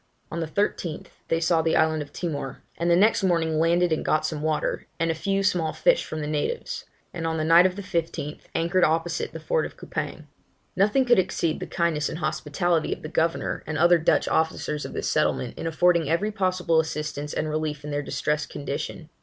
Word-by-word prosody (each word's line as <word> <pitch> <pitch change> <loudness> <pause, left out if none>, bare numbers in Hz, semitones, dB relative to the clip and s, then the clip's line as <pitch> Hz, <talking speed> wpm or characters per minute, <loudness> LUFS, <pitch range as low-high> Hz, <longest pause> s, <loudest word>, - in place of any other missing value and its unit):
On 170 - -3
the 165 - -2
13th, 170 -2 -2 0.2
they 165 - +1
saw 165 0 +3
the 160 0 +1
island 160 -1 +2
of 145 -1 -8
Timor, 145 -6 -4
and 170 +1 -1
the 170 - +6
next 210 +5 +4
morning 165 -4 +2
landed 170 +1 +3
and 160 - 0
got 155 - +1
some 155 -2 -3
water, 155 0 -1
and 165 0 +2
a - - 0
few 195 +4 -1
small 170 -4 +1
fish - - +3
from 155 - -5
the 150 - -3
natives; 155 - -2 0.3
and 165 -2 -3
on 160 0 -1
the 155 - 0
night 170 +3 +7
of 185 - -5
the 200 - -6
15th, 165 -5 -3 0.2
anchored 170 +3 +2
opposite 165 +2 +1
the - - -7
fort - - 0
of - - -7
Coupang. - - -5 0.5
Nothing 210 +8 +3
could 240 -5 +5
exceed 170 -3 0
the - - -5
kindness 165 -3 0
and 160 - -5
hospitality 165 +1 0
of - - -4
the 155 - -5
governor 165 0 0
and 150 - -2
other 170 +2 +5
Dutch 160 - +2
officers 155 -2 0
of - - -7
this - - -2
settlement, - - 0
in - - -4
affording 170 -1 +3
every 195 +6 +1
possible 185 -5 +1
assistance 150 -2 -3
and 155 - -2
relief 155 -1 -2
in 150 - -5
their 145 0 -1
distressed 150 +1 -2
condition. 145 +3 -5
165 Hz, 210 wpm, -25 LUFS, 155-175 Hz, 0.5 s, night